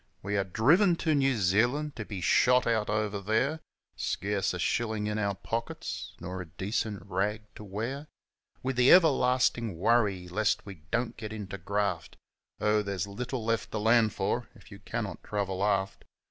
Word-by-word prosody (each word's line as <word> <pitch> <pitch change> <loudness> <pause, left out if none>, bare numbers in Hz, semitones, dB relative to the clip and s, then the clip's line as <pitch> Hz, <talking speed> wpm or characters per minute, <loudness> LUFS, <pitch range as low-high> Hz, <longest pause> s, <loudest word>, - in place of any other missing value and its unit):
We 100 +1 -2
are 100 - +2
driven 155 - +4
to 160 -1 0
New 135 -3 +2
Zealand 120 +10 +1
to 110 - -5
be 100 -4 -6
shot 125 +7 +4
out 110 -2 +1
over 105 -1 -1
there, 115 +10 +1 0.4
Scarce 100 0 -1
a 90 - -4
shillin' 110 +3 -1
in 105 0 -1
our 100 -1 0
pockets, 115 +4 -5
nor 90 +1 -5
a 90 - -8
decent 100 +3 -3
rag 105 +2 -1
to - - -10
wear, 115 +9 -4 0.6
With 130 -1 -2
the 125 +1 +5
everlastin' 130 - +4
worry 100 -2 +2
lest 105 +4 0
we 95 -6 -10
don't 115 0 -1
get 110 -1 -6
into 100 -3 -6
graft 100 -2 -2 0.4
Oh, 105 0 +2
there's 100 -2 -2
little 120 +3 -5
left 115 0 0
to - - -1
land 110 +1 +4
for - - -2
if - - -17
you - - -10
cannot - - -5
travel 100 -2 -2
aft. 100 -1 0
105 Hz, 170 wpm, -29 LUFS, 100-120 Hz, 0.6 s, the